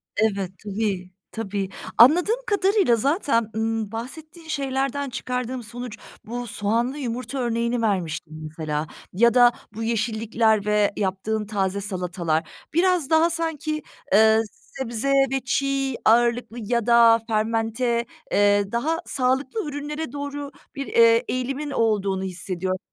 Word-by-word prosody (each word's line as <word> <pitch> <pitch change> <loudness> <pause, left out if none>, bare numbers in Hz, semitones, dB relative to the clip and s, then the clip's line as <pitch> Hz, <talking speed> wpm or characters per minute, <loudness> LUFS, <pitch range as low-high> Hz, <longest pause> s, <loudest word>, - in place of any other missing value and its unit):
Evet, 200 -4 0
tabii, 200 -3 -2 0.2
tabii. 200 -3 -3 0.3
Anladığım 335 - +6
kadarıyla 395 - +3
zaten, 265 - +1
ımm, 220 -1 -1
bahsettiğin 310 +8 -7
şeylerden 275 -1 -1
çıkardığım 250 0 -3
sonuç 235 0 -7 0.3
bu 245 +2 -5
soğanlı 230 +6 -1
yumurta 255 +1 -4
örneğini 235 0 0
vermiştin 175 -7 -1
mesela 155 0 -3 0.3
ya 235 +5 +4
da 245 -1 +7 0.2
bu 225 +2 -5
yeşillikler 225 -1 +1
ve 210 -1 +2
yaptığın 210 +2 -1
taze 200 -1 -1
salatalar. 180 -5 -2 0.2
Biraz 355 -3 +2
daha 320 +1 +4
sanki, 320 -2 -2 0.3
eee, 220 +2 +6
sebze 245 +1 -4 0.2
ve 270 - +1
çiğ 275 0 0
ağırlıklı 235 0 +3
ya 235 +1 0
da 235 -1 +6
fermente, 225 +2 0 0.3
eee, 205 0 +3
daha 300 +8 0
sağlıklı 265 - 0
ürünlere 295 0 -5
doğru 285 0 -5 0.2
bir, 275 -1 -4
eee, 230 0 +5
eğilimin 270 +4 -2
olduğunu 200 -6 +1
hissediyorum. 185 0 -3
235 Hz, 120 wpm, -24 LUFS, 210-270 Hz, 0.3 s, da